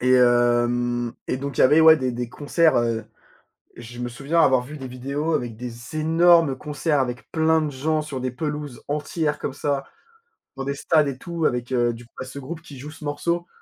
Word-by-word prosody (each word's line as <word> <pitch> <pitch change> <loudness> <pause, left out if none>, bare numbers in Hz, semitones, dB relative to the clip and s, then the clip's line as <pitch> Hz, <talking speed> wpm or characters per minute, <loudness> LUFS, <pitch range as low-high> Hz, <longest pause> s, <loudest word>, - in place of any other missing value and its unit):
Et 125 +1 +3
hem 120 -1 +2 0.2
et - - 0
donc, 140 0 -5
il - - +3
y - - +7
avait, 150 +5 +6
ouais, 160 0 +8
des 130 -3 -1
des 120 0 -4
concerts, 155 +5 +2
heu, 115 -2 0 0.7
je 120 +1 -10
me 120 0 -3
souviens 140 +7 0
avoir 130 -5 +4
vu 150 +4 -9
des 135 -2 -7
vidéos 140 +6 -3
avec 120 -5 -2
des 120 +4 -8
énormes 165 -2 +4
concerts, 150 +1 -1
avec 125 -2 -3
plein 160 0 +3
de 150 -1 -2
gens 155 +4 0
sur 150 -4 -5
des 130 0 -2
pelouses 150 -1 -5
entières, 150 +1 -1
comme - - -4
ça, 140 -1 -2 0.7
dans 135 - -3
des 140 - -1
stades 155 +1 +2
et 135 -2 -4
tout, 170 +1 -3
avec, 125 -1 -1
heu, 120 -2 +2
du 115 - -11
c 120 - -20
bah, - - -4
ce 130 +2 -8
groupe 160 +5 -7
qui 145 -5 -12
joue 145 +4 -8
ce 155 0 -11
morceau, 170 +4 -2
140 Hz, 215 wpm, -23 LUFS, 125-155 Hz, 0.7 s, ouais